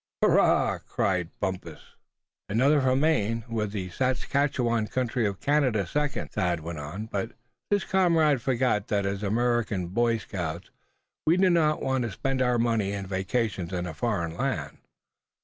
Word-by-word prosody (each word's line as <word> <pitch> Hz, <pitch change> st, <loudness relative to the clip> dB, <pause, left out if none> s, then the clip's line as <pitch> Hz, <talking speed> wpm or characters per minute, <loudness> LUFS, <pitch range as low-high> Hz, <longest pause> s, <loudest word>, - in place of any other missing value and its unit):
"Hurrah!" -, -, +4 dB
cried 90 Hz, -4 st, 0 dB
Bumpus. 95 Hz, -1 st, -5 dB, 0.6 s
"Another 135 Hz, +8 st, +3 dB
for 130 Hz, -1 st, +2 dB
Maine, 115 Hz, -7 st, +1 dB
with 110 Hz, -3 st, -2 dB
the 95 Hz, -3 st, -4 dB
Saskatchewan 130 Hz, -1 st, 0 dB
country 125 Hz, -2 st, 0 dB
of 100 Hz, -1 st, -4 dB
Canada 130 Hz, -9 st, +2 dB
second," 150 Hz, +10 st, -2 dB
Thad 85 Hz, -2 st, 0 dB
went 80 Hz, 0 st, -6 dB
on; 75 Hz, +9 st, -6 dB
"but 110 Hz, +1 st, -4 dB, 0.4 s
this 205 Hz, -1 st, +2 dB
comrade 165 Hz, -8 st, +3 dB
forgot 125 Hz, -5 st, +1 dB
that 100 Hz, -1 st, 0 dB
as 100 Hz, 0 st, -2 dB
American 110 Hz, -3 st, 0 dB
Boy 115 Hz, +4 st, +2 dB
Scouts 85 Hz, -5 st, -5 dB, 0.6 s
we 165 Hz, +3 st, +5 dB
do 185 Hz, -1 st, +4 dB
not 155 Hz, -3 st, +2 dB
want 130 Hz, -1 st, 0 dB
to 115 Hz, -, -3 dB
spend 135 Hz, +6 st, -2 dB
our 125 Hz, -1 st, +2 dB
money 115 Hz, -4 st, +1 dB
and 100 Hz, -1 st, -4 dB
vacations 95 Hz, -1 st, -2 dB
in 90 Hz, -1 st, -2 dB
a 90 Hz, -, -5 dB
foreign 85 Hz, -4 st, -2 dB
land." 110 Hz, -, -3 dB
115 Hz, 150 wpm, -27 LUFS, 95-130 Hz, 0.6 s, we